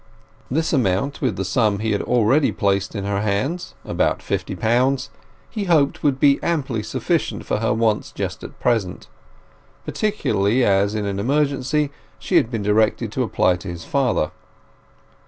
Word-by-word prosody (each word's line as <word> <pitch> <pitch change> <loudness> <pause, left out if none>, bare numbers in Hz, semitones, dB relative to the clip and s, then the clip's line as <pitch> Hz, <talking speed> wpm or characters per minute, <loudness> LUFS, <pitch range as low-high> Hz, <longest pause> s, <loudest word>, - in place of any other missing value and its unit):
This 160 +6 0
amount, 125 +1 0
with 125 -7 0
the 95 - -3
sum 105 +2 +2
he 110 +1 -1
had 100 - 0
already 125 +5 +3
placed 100 -1 0
in 100 - -3
her 100 0 -1
hands—about 110 - -1
fifty - - -3
pounds—he 130 - -2
hoped 155 -6 +2
would 140 -3 +1
be 140 -1 +4
amply 135 -9 -1
sufficient 105 - -2
for - - 0
her 115 +1 0
wants 110 -1 0
just - - -5
at - - -10
present, 110 -7 0 0.8
particularly 125 - +1
as 100 +1 +2
in 105 -1 -2
an 100 -1 -2
emergency 140 +3 0 0.3
she - - +1
had - - +3
been 115 -4 -3
directed 105 +1 +1
to - - -2
apply 90 -1 +2
to 85 - -10
his 85 -2 -6
father. 125 - +1
115 Hz, 155 wpm, -21 LUFS, 100-140 Hz, 0.8 s, be